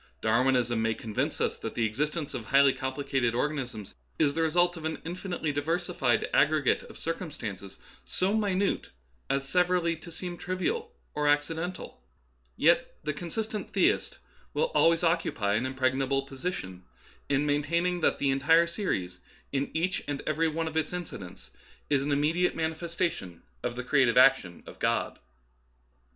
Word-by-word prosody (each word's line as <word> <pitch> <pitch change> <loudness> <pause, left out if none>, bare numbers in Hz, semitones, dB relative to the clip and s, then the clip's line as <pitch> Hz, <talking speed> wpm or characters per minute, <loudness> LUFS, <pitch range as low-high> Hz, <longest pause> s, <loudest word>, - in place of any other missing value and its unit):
Darwinism 120 0 +2
may 115 0 +1
convince 110 -3 -2
us - - 0
that - - -5
the 115 - +1
existence 150 +7 -2
of 115 - -5
highly 140 +2 +5
complicated 130 -2 -1
organisms 125 -7 -3 0.2
is 145 -2 +3
the 165 - -1
result 175 +2 +3
of 165 - -8
an 160 0 -3
infinitely 175 -2 -3
diversified 145 -4 0
aggregate 150 -2 +3
of - - -12
circumstances 115 - -5 0.3
so 190 +3 0
minute 200 -2 0 0.4
as 135 0 0
severally 180 0 +2
to 165 +2 -12
seem 175 +1 -5
trivial 435 - -2 0.2
or 150 0 0
acciden 160 +4 +1
tal; 185 - -11 0.6
yet - - +3
the 150 - -1
consistent 210 +7 -4
theist - - +2 0.4
will 485 +1 +1
always 165 +1 +4
occupy 165 - +1
an 115 +5 +1
impregnable 135 +1 0
position 135 - -5 0.5
in 140 +1 +2
maintaining 170 +5 +1
that - - +2
the 140 -1 +1
entire 160 +5 +4
series 95 - -3 0.3
in 140 0 -1
each 180 +4 -1
and 145 -1 -3
every 160 +2 +1
one 160 +1 -2
of 160 - -6
its 160 +1 0
incidents 95 - -7 0.4
is 140 -2 +3
an 145 +1 -1
immediate 155 +5 +2
manifestation 160 - -3 0.2
of 120 -1 -3
the 125 - -4
creative 130 -3 +3
ac 130 +2 +7
tion 90 -2 -12
of - - -12
God. - - 0
150 Hz, 150 wpm, -28 LUFS, 130-170 Hz, 0.6 s, ac